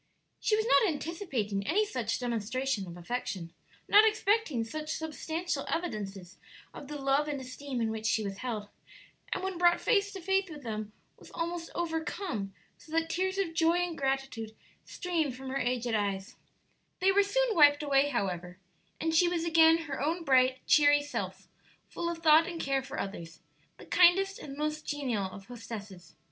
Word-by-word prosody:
She 425 Hz, -, +2 dB
was 435 Hz, 0 st, 0 dB
not 455 Hz, -3 st, +5 dB
anticipating 270 Hz, -, -3 dB
any 420 Hz, +6 st, +3 dB
such 240 Hz, -, -2 dB
demonstration 240 Hz, -1 st, -2 dB
of 175 Hz, 0 st, -9 dB
affection 185 Hz, -3 st, -4 dB, 0.3 s
not 415 Hz, +1 st, +7 dB
expecting 425 Hz, -, +2 dB
such 305 Hz, +7 st, -4 dB
substantial 320 Hz, +2 st, -3 dB
evidences 200 Hz, -, -4 dB, 0.3 s
of 280 Hz, -, -9 dB
the 295 Hz, +1 st, -5 dB
love 275 Hz, +2 st, +2 dB
and 290 Hz, -2 st, -3 dB
esteem 260 Hz, 0 st, -6 dB
in 225 Hz, -1 st, 0 dB
which 220 Hz, 0 st, -3 dB
she 220 Hz, 0 st, +1 dB
was 195 Hz, -1 st, -4 dB
held 225 Hz, -5 st, -4 dB, 0.6 s
and 370 Hz, -, -2 dB
when 380 Hz, -2 st, -3 dB
brought 345 Hz, -1 st, +5 dB
face 405 Hz, -4 st, +2 dB
to 385 Hz, -, -6 dB
face 385 Hz, +1 st, +1 dB
with 295 Hz, -3 st, -9 dB
them 215 Hz, -2 st, -4 dB, 0.3 s
was -, -, -14 dB
almost 335 Hz, 0 st, -3 dB
overcome, 320 Hz, -, -3 dB, 0.3 s
so 310 Hz, -, -16 dB
that 330 Hz, 0 st, +1 dB
tears 375 Hz, +3 st, -1 dB
of 375 Hz, -4 st, -1 dB
joy 330 Hz, 0 st, +3 dB
and 355 Hz, -1 st, -1 dB
gratitude 270 Hz, -6 st, -2 dB, 0.3 s
streamed 325 Hz, -7 st, -2 dB
from 265 Hz, +1 st, -8 dB
her 270 Hz, +1 st, -1 dB
aged 245 Hz, -1 st, -1 dB
eyes, 200 Hz, -2 st, -2 dB, 0.6 s
They 380 Hz, +1 st, +4 dB
were 400 Hz, +1 st, +5 dB
soon 475 Hz, +4 st, +1 dB
wiped 290 Hz, -1 st, +6 dB
away, 280 Hz, 0 st, +3 dB
however, 180 Hz, -7 st, -3 dB, 0.4 s
and 325 Hz, 0 st, -1 dB
she 345 Hz, +2 st, +5 dB
was 340 Hz, -1 st, -1 dB
again 325 Hz, 0 st, +5 dB
her 275 Hz, -4 st, -5 dB
own 330 Hz, +4 st, -1 dB
bright, 260 Hz, -2 st, +3 dB
cheery 290 Hz, -1 st, +5 dB
self, 290 Hz, -, -5 dB, 0.4 s
full 340 Hz, -, -3 dB
of 335 Hz, -1 st, -6 dB
thought 315 Hz, +1 st, +6 dB
and 340 Hz, -2 st, -5 dB
care 275 Hz, -2 st, 0 dB
for 265 Hz, -, -7 dB
others 165 Hz, -4 st, -6 dB, 0.4 s
the -, -, -12 dB
kindest 385 Hz, +2 st, +4 dB
and 275 Hz, -1 st, -8 dB
most 305 Hz, 0 st, -2 dB
genial 255 Hz, -9 st, -1 dB
of 195 Hz, +1 st, -8 dB
hostesses. 210 Hz, -6 st, -9 dB
290 Hz, 175 wpm, -30 LUFS, 225-340 Hz, 0.6 s, not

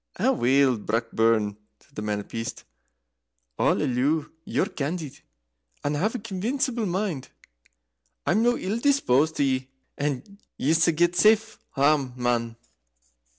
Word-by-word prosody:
"Aweel, 130 Hz, 0 st, +3 dB
Brockburn," 115 Hz, -2 st, +1 dB, 0.2 s
said 140 Hz, -, -28 dB
the 105 Hz, -, -5 dB
Man 105 Hz, -1 st, -2 dB
of -, -, -14 dB
Peace, 115 Hz, 0 st, -4 dB, 1.0 s
"I'll -, -, +3 dB
alloo 145 Hz, +4 st, 0 dB
ye're -, -, 0 dB
candid, 150 Hz, 0 st, -4 dB, 0.6 s
and 145 Hz, +1 st, 0 dB
have 215 Hz, +11 st, 0 dB
a -, -, 0 dB
convincible 230 Hz, +3 st, -2 dB
mind. 180 Hz, -6 st, -2 dB, 1.0 s
I'm 215 Hz, -, +2 dB
no 240 Hz, +1 st, +3 dB
ill 205 Hz, +5 st, -2 dB
disposit 160 Hz, -, +2 dB
to -, -, +1 dB
ye, 130 Hz, -1 st, 0 dB, 0.3 s
and 145 Hz, +8 st, -3 dB, 0.2 s
yese 160 Hz, +4 st, +3 dB
get 170 Hz, +2 st, +2 dB
safe 220 Hz, +3 st, +3 dB, 0.2 s
hame, 140 Hz, -2 st, +2 dB
man." 120 Hz, -2 st, -1 dB
145 Hz, 125 wpm, -25 LUFS, 125-195 Hz, 1.0 s, Aweel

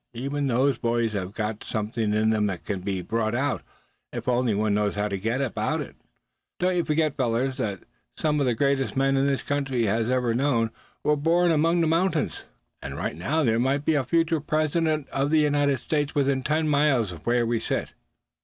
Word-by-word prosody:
Even 140 Hz, +4 st, -2 dB
those 130 Hz, +1 st, +2 dB
boys 115 Hz, -1 st, 0 dB
have 95 Hz, -2 st, -3 dB
got 105 Hz, 0 st, -4 dB
something 110 Hz, 0 st, -2 dB
in 110 Hz, +1 st, +2 dB
them 105 Hz, -1 st, +1 dB
that 95 Hz, -3 st, -5 dB
can 100 Hz, -2 st, -2 dB
be 95 Hz, -1 st, -3 dB
brought 110 Hz, +4 st, -1 dB
out, 135 Hz, +2 st, 0 dB, 0.5 s
if -, -, -6 dB
only 125 Hz, -3 st, +2 dB
one 105 Hz, 0 st, +1 dB
knows 105 Hz, 0 st, 0 dB
how 105 Hz, 0 st, 0 dB
to 100 Hz, -, -3 dB
go 110 Hz, +7 st, -1 dB
about 120 Hz, -, -1 dB
it. -, -, -7 dB, 0.6 s
Don't 180 Hz, 0 st, +1 dB
you 175 Hz, -, +2 dB
forget, 155 Hz, -2 st, +1 dB
fellows, 130 Hz, 0 st, 0 dB
that 105 Hz, -8 st, -3 dB, 0.3 s
some 150 Hz, -1 st, +1 dB
of 140 Hz, -, +1 dB
the 120 Hz, -, +1 dB
greatest 140 Hz, +1 st, 0 dB
men 135 Hz, 0 st, +3 dB
this 140 Hz, -1 st, 0 dB
country 135 Hz, -4 st, 0 dB
has 110 Hz, +3 st, 0 dB
ever 125 Hz, -2 st, +1 dB
known, 120 Hz, -3 st, +1 dB, 0.3 s
were 150 Hz, -, +3 dB
born 170 Hz, +4 st, +2 dB
among 165 Hz, +2 st, +3 dB
the -, -, +3 dB
mountains. 165 Hz, 0 st, 0 dB, 0.4 s
And -, -, -6 dB
right -, -, -3 dB
now 145 Hz, -, 0 dB
there 115 Hz, -3 st, +2 dB
may 135 Hz, +3 st, +2 dB
be 150 Hz, +2 st, 0 dB
a 145 Hz, -3 st, +2 dB
future 165 Hz, +4 st, +1 dB
president 155 Hz, 0 st, 0 dB
of 135 Hz, +1 st, 0 dB
the 155 Hz, 0 st, +4 dB
United 145 Hz, -2 st, +2 dB
States 145 Hz, +3 st, -2 dB
within 140 Hz, -2 st, +2 dB
ten 155 Hz, +3 st, 0 dB
miles 140 Hz, -8 st, +2 dB
of 85 Hz, +3 st, -11 dB
where 120 Hz, 0 st, +3 dB
we 115 Hz, 0 st, 0 dB
sit." -, -, -3 dB
130 Hz, 200 wpm, -25 LUFS, 110-150 Hz, 0.6 s, the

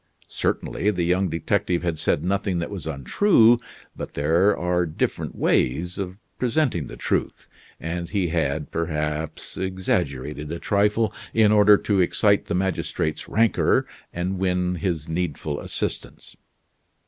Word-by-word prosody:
Certainly, 105 Hz, -, -1 dB
the 90 Hz, -4 st, 0 dB
young 90 Hz, +2 st, +1 dB
detective 85 Hz, +2 st, 0 dB
had 85 Hz, -3 st, -1 dB
said 75 Hz, -, +1 dB
nothing 95 Hz, -1 st, 0 dB
that 85 Hz, +3 st, -3 dB
was 95 Hz, -5 st, -6 dB
untrue; 115 Hz, -, +4 dB, 0.4 s
but -, -, -7 dB
there 85 Hz, +8 st, +3 dB
are 90 Hz, 0 st, 0 dB
different 75 Hz, -, -2 dB
ways 85 Hz, +9 st, +1 dB
of 95 Hz, -1 st, -4 dB, 0.2 s
presenting 120 Hz, -, 0 dB
the -, -, -9 dB
truth, -, -, -2 dB, 0.3 s
and 85 Hz, +1 st, -4 dB
he 95 Hz, -3 st, 0 dB
had, 80 Hz, -3 st, -1 dB
perhaps, 75 Hz, -1 st, -3 dB
exaggerated 75 Hz, -6 st, -2 dB
a 85 Hz, -, -3 dB
trifle 105 Hz, +4 st, +1 dB, 0.2 s
in 110 Hz, -2 st, +5 dB
order 105 Hz, -1 st, +7 dB
to 100 Hz, -2 st, +1 dB
excite 100 Hz, +3 st, +3 dB
the -, -, -2 dB
magistrate's 90 Hz, -4 st, -2 dB
rancor, 115 Hz, 0 st, +3 dB, 0.3 s
and 90 Hz, +2 st, -3 dB
win 90 Hz, -1 st, +1 dB
his 80 Hz, -2 st, -2 dB
needful 80 Hz, -3 st, -2 dB
assistance. -, -, -4 dB
90 Hz, 135 wpm, -24 LUFS, 80-100 Hz, 0.4 s, order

